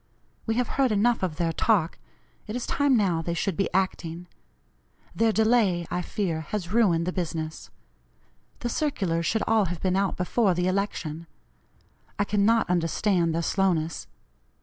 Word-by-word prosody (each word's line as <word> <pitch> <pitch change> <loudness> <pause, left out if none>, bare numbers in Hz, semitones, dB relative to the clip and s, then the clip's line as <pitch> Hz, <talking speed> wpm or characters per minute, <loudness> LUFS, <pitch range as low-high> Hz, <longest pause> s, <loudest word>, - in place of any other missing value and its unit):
We 225 - +1
have 245 0 +1
heard 260 -3 +3
enough 230 +3 +2
of 180 -5 -2
their 165 0 -1
talk 180 -4 +1 0.5
it 215 - -5
is 245 - -3
time 285 -3 +2
now 180 -6 +1
they 170 +1 -3
should 190 +1 -1
be 195 - -1
acting. 175 -2 -2 0.9
Their 225 -1 +2
delay, 215 -6 +2
I 180 - -1
fear, 180 -5 -2
has 190 -4 -4
ruined 180 -8 +3
the 180 - -2
business. 160 -3 -4 0.9
The 240 - -2
circulars 190 - -1
should 220 - +1
all 220 -2 +3
have 175 -1 -4
been 185 -1 0
out 195 -1 0
before 185 +1 +1
the 180 +1 0
election. 170 -4 -2 0.9
I 205 - +2
cannot 210 +3 +2
understand 175 0 +1
their 170 - -1
slowness. 165 - 0
185 Hz, 155 wpm, -26 LUFS, 170-215 Hz, 0.9 s, heard